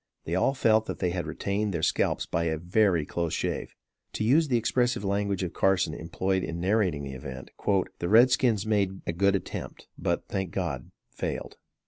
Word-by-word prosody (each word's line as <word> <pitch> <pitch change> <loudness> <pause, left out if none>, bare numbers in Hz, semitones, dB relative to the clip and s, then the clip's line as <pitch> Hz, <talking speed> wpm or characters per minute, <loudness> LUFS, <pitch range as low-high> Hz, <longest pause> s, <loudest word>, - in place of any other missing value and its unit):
They - - -3
all 135 - +2
felt 110 -3 +3
that - - -4
they 90 -2 0
had 85 -1 -3
retained 100 -1 -2
their - - -2
scalps - - +1
by 85 +1 -1
a 80 -1 0
very 90 -1 +2
close 85 0 -2
shave. - - -3 0.4
To - - -2
use 150 +8 +4
the 125 -3 +2
expressive 120 0 +1
language 100 -1 0
of 90 - -3
Carson 95 -4 +2
employed 95 +4 -1
in 85 +1 -4
narrating 90 -5 +1
the 70 -1 -6
event 65 0 -8 0.5
"The 85 - -2
red 120 +5 +7
skins 115 -5 +2
made 100 -3 0
a 85 - -1
good 100 +3 +3
attempt 95 - -5
but, - - -1
thank 95 -2 -2
God, 85 -9 -3 0.2
failed." - - -4
95 Hz, 185 wpm, -28 LUFS, 85-110 Hz, 0.5 s, red